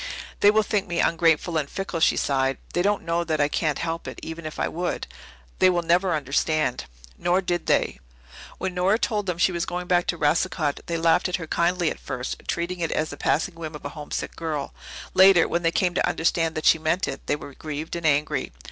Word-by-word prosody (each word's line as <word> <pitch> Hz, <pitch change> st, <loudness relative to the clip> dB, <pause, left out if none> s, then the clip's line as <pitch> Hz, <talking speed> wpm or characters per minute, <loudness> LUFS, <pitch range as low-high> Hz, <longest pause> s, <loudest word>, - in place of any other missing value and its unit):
"They 205 Hz, -, +6 dB
will 215 Hz, +1 st, +4 dB
think 205 Hz, -1 st, -1 dB
me 170 Hz, -1 st, -2 dB
ungrateful 165 Hz, 0 st, +2 dB
and 145 Hz, -2 st, -4 dB
fickle," 195 Hz, -3 st, -4 dB
she 160 Hz, -, +4 dB
sighed. 135 Hz, -1 st, +1 dB, 0.2 s
"They 175 Hz, -, +1 dB
don't 205 Hz, +2 st, +1 dB
know 170 Hz, +1 st, 0 dB
that 160 Hz, -2 st, -1 dB
I 145 Hz, -, +4 dB
can't 150 Hz, 0 st, 0 dB
help 165 Hz, 0 st, -3 dB
it -, -, -7 dB
even 160 Hz, 0 st, -6 dB
if 155 Hz, -, -8 dB
I -, -, +1 dB
would. 175 Hz, +1 st, -3 dB, 0.5 s
They 185 Hz, -, +6 dB
will 175 Hz, -1 st, +1 dB
never 175 Hz, +2 st, +2 dB
understand." 145 Hz, -1 st, 0 dB, 0.3 s
Nor 180 Hz, +2 st, +2 dB
did 175 Hz, -2 st, -2 dB
they. -, -, +1 dB, 0.6 s
When 190 Hz, 0 st, -3 dB
Nora 185 Hz, +4 st, +2 dB
told 210 Hz, -4 st, -1 dB
them 180 Hz, -2 st, -1 dB
that -, -, -4 dB
she -, -, +4 dB
was 170 Hz, -1 st, -2 dB
going 180 Hz, 0 st, -3 dB
back 175 Hz, -1 st, +2 dB
to 170 Hz, -, 0 dB
Racicot, 155 Hz, -1 st, +1 dB
they 170 Hz, -, -1 dB
laughed 165 Hz, +2 st, +3 dB
at 180 Hz, -, 0 dB
her 165 Hz, -, -4 dB
kindly 170 Hz, +1 st, +1 dB
at -, -, -7 dB
first, 130 Hz, -2 st, -5 dB
treating 175 Hz, +1 st, -2 dB
it 165 Hz, -, -1 dB
as 155 Hz, 0 st, -1 dB
the -, -, -6 dB
passing 170 Hz, +6 st, 0 dB
whim 160 Hz, -2 st, -7 dB
of 150 Hz, -, -10 dB
a -, -, -2 dB
homesick 150 Hz, -1 st, -5 dB
girl. 155 Hz, -4 st, -4 dB, 0.4 s
Later, 190 Hz, -2 st, +7 dB
when 170 Hz, -, 0 dB
they 165 Hz, -, +2 dB
came 180 Hz, +1 st, +1 dB
to -, -, +1 dB
understand 165 Hz, 0 st, 0 dB
that 155 Hz, -, -3 dB
she 160 Hz, -, +6 dB
meant 160 Hz, +4 st, 0 dB
it, -, -, -6 dB
they -, -, +2 dB
were 140 Hz, -1 st, -9 dB
grieved 155 Hz, +3 st, -5 dB
and 170 Hz, -2 st, -1 dB
angry. 150 Hz, -2 st, +1 dB
165 Hz, 230 wpm, -24 LUFS, 155-180 Hz, 0.6 s, Later